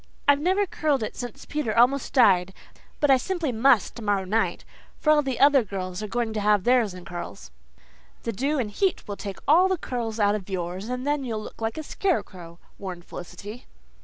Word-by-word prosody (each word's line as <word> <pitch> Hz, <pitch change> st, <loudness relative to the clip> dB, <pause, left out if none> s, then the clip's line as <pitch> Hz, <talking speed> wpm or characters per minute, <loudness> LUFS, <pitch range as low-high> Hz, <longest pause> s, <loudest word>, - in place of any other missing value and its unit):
I've 285 Hz, 0 st, +5 dB
never 375 Hz, +6 st, +2 dB
curled 300 Hz, -, 0 dB
it -, -, -5 dB
since 245 Hz, +3 st, -7 dB
Peter 290 Hz, -8 st, -2 dB
almost 255 Hz, +4 st, +3 dB
died, 190 Hz, -7 st, +4 dB, 0.4 s
but 295 Hz, -2 st, +3 dB
I 265 Hz, -, +7 dB
simply 335 Hz, +1 st, -2 dB
must 235 Hz, -2 st, +3 dB
tomorrow 205 Hz, -4 st, -1 dB
night, 220 Hz, +4 st, 0 dB, 0.3 s
for 305 Hz, -, +2 dB
all 300 Hz, -1 st, +5 dB
the 265 Hz, -3 st, -3 dB
other 280 Hz, -2 st, +6 dB
girls 185 Hz, -2 st, -5 dB
are 215 Hz, -, -4 dB
going 230 Hz, 0 st, -2 dB
to 215 Hz, -, -2 dB
have 205 Hz, -2 st, +3 dB
theirs 240 Hz, -5 st, +3 dB
in 180 Hz, -1 st, -10 dB
curls." 100 Hz, -, -8 dB, 0.7 s
"The 230 Hz, -, -2 dB
dew 275 Hz, +9 st, 0 dB
and 225 Hz, -6 st, -2 dB
heat 385 Hz, -, 0 dB
will 205 Hz, -, -4 dB
take 200 Hz, -1 st, -6 dB
all 340 Hz, +6 st, +6 dB
the 375 Hz, -1 st, 0 dB
curl 240 Hz, -7 st, -3 dB
out 205 Hz, -1 st, +3 dB
of 205 Hz, -2 st, -4 dB
yours 185 Hz, +3 st, -4 dB
and 250 Hz, +1 st, -3 dB
then 290 Hz, -1 st, 0 dB
you'll 220 Hz, -4 st, -3 dB
look -, -, -11 dB
like 225 Hz, +3 st, -2 dB
a 315 Hz, -, -4 dB
scarecrow," 185 Hz, -, -3 dB, 0.2 s
warned 180 Hz, -3 st, -7 dB
Felicity. 200 Hz, +7 st, -9 dB
225 Hz, 200 wpm, -25 LUFS, 195-280 Hz, 0.7 s, I